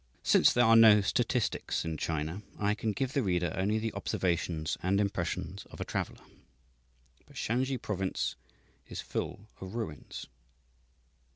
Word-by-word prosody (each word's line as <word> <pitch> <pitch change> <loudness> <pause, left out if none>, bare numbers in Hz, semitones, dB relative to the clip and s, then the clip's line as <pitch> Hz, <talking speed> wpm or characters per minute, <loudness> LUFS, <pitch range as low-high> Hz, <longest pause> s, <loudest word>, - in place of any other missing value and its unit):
Since - - +6
there 120 -1 +4
are 115 0 +7
no 110 -2 +8
statistics 120 -3 0
in 80 -1 -2
China, 80 +4 -2 0.2
I 105 0 +1
can 110 0 -1
give 130 +6 -2
the 140 - +2
reader 90 -6 0
only 100 +3 +1
the 110 0 -2
observations 85 -5 -1
and 95 +2 +2
impressions 95 -4 -2
of - - -12
a - - -3
traveller. - - -4 1.0
But - - -18
Shansi 130 +3 0
Province 95 - -2 0.5
is - - -6
full 105 +2 -4
of 95 +3 -7
ruins. 110 -11 -5
100 Hz, 145 wpm, -31 LUFS, 90-115 Hz, 1.0 s, no